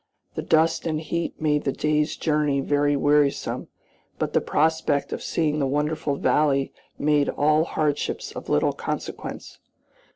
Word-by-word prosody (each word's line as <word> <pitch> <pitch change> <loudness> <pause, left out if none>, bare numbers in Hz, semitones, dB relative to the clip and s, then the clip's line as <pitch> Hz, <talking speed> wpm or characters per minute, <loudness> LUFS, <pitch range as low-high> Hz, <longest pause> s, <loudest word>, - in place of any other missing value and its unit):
The - - -3
dust 160 +1 +2
and 155 -1 -1
heat 170 +1 -3
made 150 -1 +1
the 135 - 0
day's 150 +2 0
journey 150 -3 +1
very 145 +1 +1
wearisome, 145 0 +1 0.5
but - - -2
the - - +3
prospect 155 -2 +1
of - - -4
seeing 155 -2 0
the 140 - +1
wonderful 150 +1 -1
valley 140 -1 +1 0.2
made 145 -1 +2
all 155 +2 +2
hardships 150 -3 -2
of - - -8
little 75 - +2
consequence. - - -6
150 Hz, 140 wpm, -24 LUFS, 145-155 Hz, 0.5 s, the